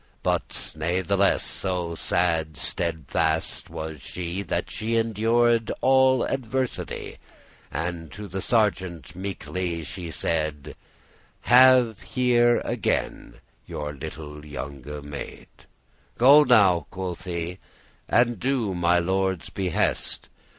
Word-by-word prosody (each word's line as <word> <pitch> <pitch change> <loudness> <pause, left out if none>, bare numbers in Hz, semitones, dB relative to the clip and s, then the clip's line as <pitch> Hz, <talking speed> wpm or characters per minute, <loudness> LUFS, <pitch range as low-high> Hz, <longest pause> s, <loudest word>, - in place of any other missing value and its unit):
But - - -2
natheless 90 +5 +1
so 90 -3 -2
sad 80 -3 0
steadfast 80 -1 -1
was 80 -2 -6
she, 90 +6 -4
That - - -3
she 115 +2 -2
endured 115 +1 +2
all 130 -1 +4
adversity, 130 0 -3 0.5
And 85 0 -4
to 105 -1 -7
the 95 +1 -4
sergeant 95 -8 0
meekely 90 -2 -4
she 85 +2 -6
said, 75 -3 -2 0.7
"Have 125 -3 +6
here 120 -2 +2
again 105 - -2 0.3
your 75 0 -5
little 75 0 -8
younge 70 -2 -7 0.2
maid. 70 -1 -8 0.7
"Go 140 +5 +7
now," 95 - +4
quoth 95 -1 -5
she, 85 0 -4 0.5
"and 120 0 +3
do 125 -7 0
my 90 0 +2
lord's 95 -1 0
behest. 95 -2 -1
90 Hz, 100 wpm, -25 LUFS, 80-115 Hz, 0.7 s, Go